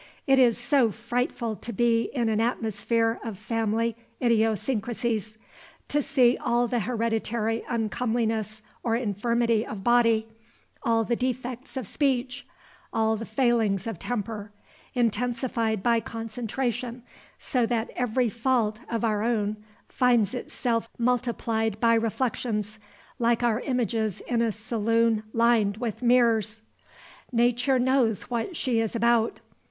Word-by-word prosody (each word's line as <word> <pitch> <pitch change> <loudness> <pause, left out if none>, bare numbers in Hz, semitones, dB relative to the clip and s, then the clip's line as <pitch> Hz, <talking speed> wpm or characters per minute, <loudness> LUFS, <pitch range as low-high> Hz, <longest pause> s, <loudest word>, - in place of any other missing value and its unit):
It 270 -1 +4
is 240 -3 +5
so 240 0 +3
frightful 235 0 -2
to 235 - -7
be 230 +1 +2
in 240 -3 +1
an 220 0 +1
atmosphere 225 0 0
of 225 -4 -5
family 225 +1 -1 0.2
idiosyncrasies; 225 -1 0 0.5
to 295 - +2
see 260 -3 +3
all 240 0 +2
the 240 +1 0
hereditary 225 0 -1
uncomeliness 220 -1 -1 0.2
or 230 -2 0
infirmity 230 0 +1
of 210 -4 -7
body, 230 -1 +3 0.5
all 225 -1 +2
the 235 +2 0
defects 255 +1 -3
of 260 - -3
speech, 260 +2 -1 0.4
all 220 0 +2
the 220 +1 -6
failings 225 -7 +1
of 225 -7 -5
temper, 215 -3 -4 0.4
intensified 235 -2 0
by 235 -1 +3
concentration, 235 +2 -4 0.3
so 245 -3 0
that 230 -1 -1
every 245 0 +1
fault 230 -1 0
of 230 0 -1
our 210 -2 +1
own 215 -2 0 0.3
finds 240 -5 +2
itself 235 -2 -2
multiplied 230 -3 0
by 230 0 +4
reflections, 225 -2 -1 0.4
like 235 0 +2
our 235 -2 +2
images 230 -6 -1
in 235 -1 -1
a 230 -1 +2
saloon 225 +1 +1
lined 230 -3 +3
with 230 -2 -4
mirrors! 230 -3 +3 0.7
Nature 245 +2 +2
knows 250 -4 +1
what 240 +10 -2
she 245 -4 +1
is 225 0 -1
about. 235 0 +2
230 Hz, 125 wpm, -26 LUFS, 220-245 Hz, 0.7 s, is